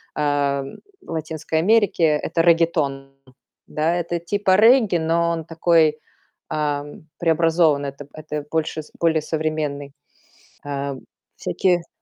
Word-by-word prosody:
а, 145 Hz, -2 st, 0 dB, 0.4 s
в -, -, -12 dB
Латинской 160 Hz, 0 st, -3 dB
Америке. 205 Hz, -2 st, +2 dB
Это 155 Hz, +2 st, 0 dB
реггетон, 160 Hz, -5 st, +1 dB, 0.6 s
да? 155 Hz, +2 st, 0 dB
Это 175 Hz, 0 st, -2 dB
типа 190 Hz, +2 st, +1 dB
регги, 225 Hz, -2 st, +5 dB
но 170 Hz, +1 st, +1 dB
он 165 Hz, -1 st, -3 dB
такой, 165 Hz, -1 st, +2 dB, 0.5 s
ам, 150 Hz, -1 st, -3 dB
преобразованный. 160 Hz, -3 st, +2 dB
Это 140 Hz, +1 st, -11 dB
это 150 Hz, -1 st, -6 dB
больше 160 Hz, 0 st, -2 dB, 0.2 s
более 160 Hz, -2 st, +2 dB
современный. 155 Hz, -2 st, -3 dB, 0.7 s
Э, 140 Hz, -1 st, -3 dB, 0.4 s
всякие 175 Hz, -, 0 dB
160 Hz, 110 wpm, -21 LUFS, 145-170 Hz, 0.7 s, регги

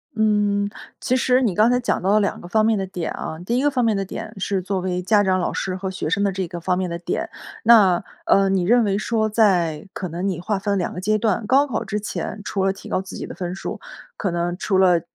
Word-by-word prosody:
嗯， 205 Hz, -2 st, +2 dB, 0.3 s
其 255 Hz, -, 0 dB
实 255 Hz, 0 st, +3 dB
你 215 Hz, -8 st, +1 dB
刚 215 Hz, +4 st, +5 dB
才 250 Hz, -, +3 dB
讲 245 Hz, -, -1 dB
到 190 Hz, -, 0 dB
了 215 Hz, -, +5 dB
两 200 Hz, -, -1 dB
个 175 Hz, -, -9 dB
方 215 Hz, +1 st, +3 dB
面 220 Hz, -1 st, +3 dB
的 195 Hz, -, -2 dB
点 180 Hz, -3 st, -4 dB
啊， 160 Hz, -, -6 dB
第 235 Hz, +5 st, 0 dB
一 260 Hz, -, +1 dB
个 290 Hz, -, +3 dB
方 250 Hz, -3 st, +1 dB
面 220 Hz, -, +2 dB
的 195 Hz, -, -1 dB
点 195 Hz, -, -7 dB
是 190 Hz, 0 st, 0 dB
作 190 Hz, 0 st, -2 dB
为 180 Hz, 0 st, -2 dB
家 205 Hz, +2 st, +3 dB
长 185 Hz, -1 st, +2 dB
老 180 Hz, -, -1 dB
师 190 Hz, -1 st, -2 dB
和 190 Hz, 0 st, -4 dB
学 185 Hz, -4 st, -4 dB
生 200 Hz, -, +1 dB
的 200 Hz, -1 st, +1 dB
这 185 Hz, -2 st, -3 dB
个 175 Hz, -, -6 dB
方 180 Hz, +1 st, 0 dB
面 185 Hz, -1 st, -1 dB
的 170 Hz, 0 st, -4 dB
点。 175 Hz, -, -3 dB, 0.3 s
那， 210 Hz, -7 st, +6 dB, 0.2 s
呃， 195 Hz, 0 st, +4 dB
你 190 Hz, -2 st, +1 dB
认 235 Hz, +6 st, +4 dB
为 200 Hz, -2 st, +1 dB
说 220 Hz, 0 st, 0 dB
在 185 Hz, -6 st, +2 dB
可 185 Hz, -, -4 dB
能 175 Hz, +4 st, -3 dB
你 185 Hz, -4 st, -1 dB
划 195 Hz, +1 st, -1 dB
分 200 Hz, 0 st, -1 dB
了 -, -, +1 dB
2 180 Hz, -, -2 dB
个 180 Hz, -, -5 dB
阶 215 Hz, +3 st, +1 dB
段， 215 Hz, 0 st, 0 dB
高 275 Hz, +3 st, +5 dB
考 255 Hz, -7 st, -3 dB
之 210 Hz, -, -2 dB
前， 210 Hz, 0 st, -5 dB
除 195 Hz, -2 st, -1 dB
了 195 Hz, -, +2 dB
提 -, -, -12 dB
高 -, -, 0 dB
自 190 Hz, -, -10 dB
己 -, -, -5 dB
的 -, -, -8 dB
分 180 Hz, -1 st, -4 dB
数， -, -, -5 dB, 0.4 s
可 195 Hz, -, -1 dB
能 175 Hz, +1 st, -2 dB
除 195 Hz, -1 st, 0 dB
了， 180 Hz, -3 st, +4 dB
195 Hz, 290 characters per minute, -22 LUFS, 185-215 Hz, 0.4 s, 那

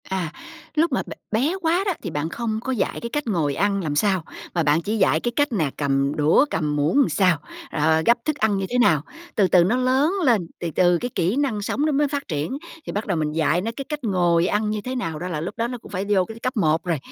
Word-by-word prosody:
À, 185 Hz, -4 st, -2 dB, 0.4 s
lúc 320 Hz, +1 st, +2 dB
mà 255 Hz, -, 0 dB
b -, -, -14 dB, 0.2 s
bé 265 Hz, -, +1 dB
quá 345 Hz, +2 st, +2 dB
đó 390 Hz, -, +1 dB
thì 180 Hz, -, -3 dB
bạn 155 Hz, 0 st, -2 dB
không 220 Hz, +2 st, -2 dB
có 260 Hz, -, -2 dB
dạy 240 Hz, -6 st, -1 dB
cái 235 Hz, -, -4 dB
cách 295 Hz, +2 st, -3 dB
ngồi 160 Hz, -9 st, 0 dB
ăn 200 Hz, 0 st, +1 dB
làm 150 Hz, -3 st, -2 dB
sao, 190 Hz, +1 st, +2 dB, 0.3 s
mà 170 Hz, -, +1 dB
bạn 150 Hz, +2 st, +3 dB
chỉ 215 Hz, +6 st, -2 dB
dạy 155 Hz, -6 st, +3 dB
cái 240 Hz, -, -2 dB
cách 290 Hz, -1 st, +2 dB
nè 165 Hz, -11 st, +1 dB
cầm 140 Hz, 0 st, +1 dB
đũa, 155 Hz, -, +4 dB
cầm 150 Hz, -2 st, -1 dB
muỗng 155 Hz, -, +3 dB
sao, 185 Hz, -5 st, +3 dB, 0.3 s
rồi 160 Hz, +1 st, +2 dB
gắp 235 Hz, -, +5 dB
thức 305 Hz, -, 0 dB
ăn 215 Hz, -6 st, +1 dB
như 195 Hz, -, -1 dB
thế 250 Hz, -, 0 dB
nào. 160 Hz, -, +4 dB, 0.3 s
Từ 200 Hz, -3 st, +4 dB
từ 180 Hz, -1 st, +5 dB
nó 190 Hz, +8 st, +2 dB
lớn 260 Hz, +6 st, +2 dB
lên, 225 Hz, -, +3 dB
từ 170 Hz, -, -3 dB
từ 175 Hz, -1 st, +4 dB
cái 245 Hz, -, -3 dB
kỹ 180 Hz, +4 st, +1 dB
năng 265 Hz, -7 st, 0 dB
sống 275 Hz, +8 st, -1 dB
nó 310 Hz, -, +2 dB
mới 290 Hz, +1 st, +2 dB
phát 285 Hz, 0 st, -4 dB
triển, 155 Hz, -, -2 dB, 0.3 s
thì -, -, -4 dB
bắt 205 Hz, +2 st, -3 dB
đầu 185 Hz, -4 st, 0 dB
mình 155 Hz, -1 st, -1 dB
dạy 160 Hz, +2 st, +1 dB
nó 225 Hz, +4 st, -2 dB
cái 275 Hz, -, -4 dB
cách 300 Hz, -2 st, -4 dB
ngồi 175 Hz, -5 st, +2 dB
ăn 210 Hz, +2 st, 0 dB
như 215 Hz, 0 st, -2 dB
thế 255 Hz, +4 st, -4 dB
nào 165 Hz, -11 st, -3 dB
đó 180 Hz, -, -4 dB
là 155 Hz, -4 st, -3 dB
lúc 185 Hz, +8 st, -5 dB
đó 230 Hz, 0 st, 0 dB
nó 245 Hz, +1 st, -5 dB
cũng -, -, -14 dB
phải 195 Hz, 0 st, -2 dB
vô 190 Hz, -3 st, +3 dB
cái 225 Hz, +2 st, -10 dB
cấp 255 Hz, +1 st, -3 dB
1 160 Hz, -4 st, +2 dB
rồi. 170 Hz, -3 st, 0 dB
200 Hz, 270 wpm, -23 LUFS, 165-250 Hz, 0.4 s, gắp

